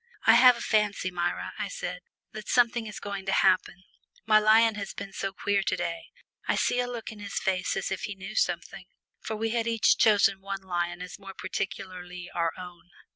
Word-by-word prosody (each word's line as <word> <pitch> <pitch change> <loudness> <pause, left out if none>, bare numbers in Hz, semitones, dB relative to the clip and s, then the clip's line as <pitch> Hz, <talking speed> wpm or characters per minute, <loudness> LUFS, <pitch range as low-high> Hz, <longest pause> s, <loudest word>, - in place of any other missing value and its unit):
"I - - +8
have 250 0 +7
a - - -8
fancy, 210 -4 +1
Myra," 175 -1 -2
I - - -1
said, - - -5 0.3
"that 215 -1 -9
something 235 -2 +2
is 210 - -7
going 200 -1 -5
to - - +1
happen. 185 -1 +2 0.4
My 215 -1 +6
lion 220 +1 +5
has 200 -2 -6
been 200 0 -7
so 195 - -3
queer 200 +1 0
to - - 0
day 170 0 -3 0.4
I - - +2
see 245 - +1
a 245 - 0
look 240 -3 -6
on 215 - -11
his 205 -1 -7
face 185 -1 0
as - - -3
if 190 - -2
he 210 - -6
knew 190 0 -8
something." - - -2 0.3
For 220 - -5
we 225 +1 -2
had 235 0 0
each 230 -1 +3
chosen 200 -3 +4
one 195 0 -5
lion 175 -1 -2
as 180 - -9
more 195 -1 -10
particularly 180 -2 -5
our 170 -1 +1
own. 180 -1 -11
200 Hz, 205 wpm, -28 LUFS, 185-220 Hz, 0.4 s, I